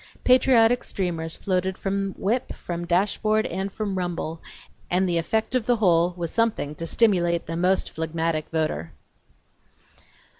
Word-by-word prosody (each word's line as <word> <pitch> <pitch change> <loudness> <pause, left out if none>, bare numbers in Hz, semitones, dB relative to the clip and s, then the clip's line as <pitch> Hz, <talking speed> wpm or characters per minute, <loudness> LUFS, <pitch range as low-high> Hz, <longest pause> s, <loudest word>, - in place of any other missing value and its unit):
Patriotic 250 -2 +5
streamers 165 -4 -3
floated 185 -1 -1
from 195 0 -2
whip, 230 +6 -1
from 175 0 -5
dash 180 +4 +1
board 215 0 +2
and 190 +3 -3
from 200 -2 -3
rumble, 170 -2 -3 0.5
and 185 +1 +2
the 170 -1 +1
effect 220 +8 -1
of 250 -3 0
the 245 - +4
whole 175 -5 +3
was 170 -2 -3
something 225 -10 0
to 165 +2 -5
stimulate 175 -6 +2
the 165 - -4
most 180 +3 +1
phlegmatic 160 0 -2
voter. 85 - -2
180 Hz, 145 wpm, -24 LUFS, 165-210 Hz, 0.5 s, Patriotic